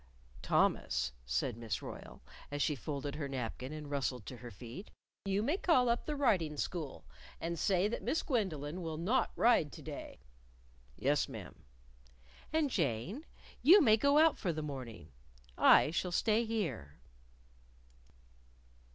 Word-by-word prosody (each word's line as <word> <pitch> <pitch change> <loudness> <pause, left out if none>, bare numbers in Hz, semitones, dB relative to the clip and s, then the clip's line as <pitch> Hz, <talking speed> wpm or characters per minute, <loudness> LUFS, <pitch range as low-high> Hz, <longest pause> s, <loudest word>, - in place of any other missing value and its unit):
"Thomas," 65 - +1 0.2
said 65 - -1
Miss 115 -3 -4
Royle, - - -9 0.3
as 145 0 -1
she 150 - +1
folded 140 0 -4
her 145 -1 -4
napkin 130 0 -4
and 155 -1 -7
rustled 130 -5 -2
to 125 - -8
her 120 0 -9
feet, 120 - -10 0.4
"you 195 +1 0
may 295 +10 +1
call 255 -11 +3
up 235 - 0
the 300 - -1
Riding 185 - +1
School 155 -3 -4 0.3
and 170 0 -3
say 190 0 +2
that 220 - -3
Miss 325 - -1
Gwendolyn 180 - -2
will 160 -2 -4
not 205 +11 +1
ride 225 -11 +3
to - - -10
day." - - -7 0.8
"Yes, - - +1
ma'am." - - -8 1.0
"And, 310 -3 +1
Jane, 170 - -2 0.3
you 350 +10 +8
may 225 - +6
go 280 +6 +3
out 315 0 +5
for 180 - 0
the 155 -1 -4
morning. 125 - -7 0.4
I - - +6
shall 180 +2 -1
stay 220 +5 +2
here." 150 - -3
165 Hz, 145 wpm, -34 LUFS, 135-230 Hz, 1.0 s, you